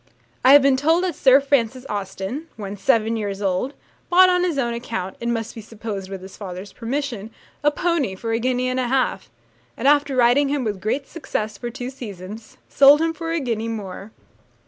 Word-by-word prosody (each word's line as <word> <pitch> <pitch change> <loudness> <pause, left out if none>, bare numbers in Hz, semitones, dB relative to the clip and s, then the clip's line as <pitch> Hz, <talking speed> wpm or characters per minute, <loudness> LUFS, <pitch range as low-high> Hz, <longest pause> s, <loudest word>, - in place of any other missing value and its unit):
I 260 - +8
have 285 -1 +8
been 275 -1 +4
told 325 +6 +2
that 365 -2 0
Sir 265 -1 +5
Francis 260 -3 0
Austen, 200 - -4
when 205 -2 -6
seven 220 +3 +2
years 200 -2 -3
old, 200 +7 -1 0.3
bought 365 +1 +7
on 360 0 +2
his 345 -5 0
own 240 -3 0
account, 225 -6 -4
it 235 - -4
must 230 -2 -2
be 225 - -8
supposed 210 -3 -7
with 190 -1 -7
his 190 - -11
father's 190 0 -8
permission, 240 -3 -4 0.3
a 295 - +5
pony 295 - -1
for 225 +4 -4
a 225 - +1
guinea 255 +1 0
and 255 0 -1
a 250 - 0
half; 260 +1 0 0.5
and - - 0
after 290 -1 +3
riding 255 +3 +4
him 285 -2 -1
with 205 -4 -3
great 270 +6 -2
success 220 -9 -4
for 240 - -5
two 245 +1 -6
seasons, 210 -3 -9
sold 280 +1 +6
him 325 0 +1
for 330 0 -5
a 335 - 0
guinea 230 -5 -2
more. 205 -2 -6
240 Hz, 200 wpm, -22 LUFS, 210-280 Hz, 0.5 s, I